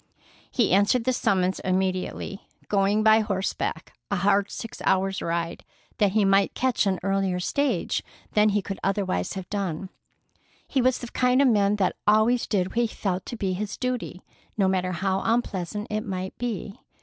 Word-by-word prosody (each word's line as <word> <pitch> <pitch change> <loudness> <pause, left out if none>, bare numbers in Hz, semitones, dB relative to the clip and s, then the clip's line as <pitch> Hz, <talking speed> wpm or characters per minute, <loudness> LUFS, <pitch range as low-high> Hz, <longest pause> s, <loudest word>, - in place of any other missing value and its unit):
He 235 -5 +1
answered 205 +5 +3
the 255 +2 +1
summons 185 -5 +1
immediately, 185 +1 -2 0.2
going 200 +1 +2
by 220 0 +6
horseback 200 -3 -2 0.2
a 200 - 0
hard 200 +2 +2
six 230 - -7
hours 195 0 +1
ride 170 0 -2 0.4
that 200 -2 +3
he 210 -2 +3
might 195 0 +3
catch 255 -5 +1
an 190 -2 0
earlier 195 -2 0
stage 250 +1 0 0.3
than 210 0 +4
he 205 -1 +1
could 195 0 -5
otherwise 190 - -1
have 190 -2 -6
done. 190 -3 -3 0.8
He 265 - +1
was 255 0 +3
the 240 - -7
kind 250 +1 +2
of 280 -2 +5
man 205 -2 +3
that 195 -3 0
always 215 +3 +4
did 190 -3 0
what - - -10
he 240 -1 +3
felt 185 -4 -3
to 235 - -5
be 190 -3 -1
his 205 +2 -4
duty, 250 -7 -3 0.3
no 195 -2 +3
matter 185 -1 0
how 190 +1 0
unpleasant 210 -4 -1
it 215 0 0
might 190 -3 -4
be. 220 -4 -4
200 Hz, 175 wpm, -25 LUFS, 190-220 Hz, 0.8 s, by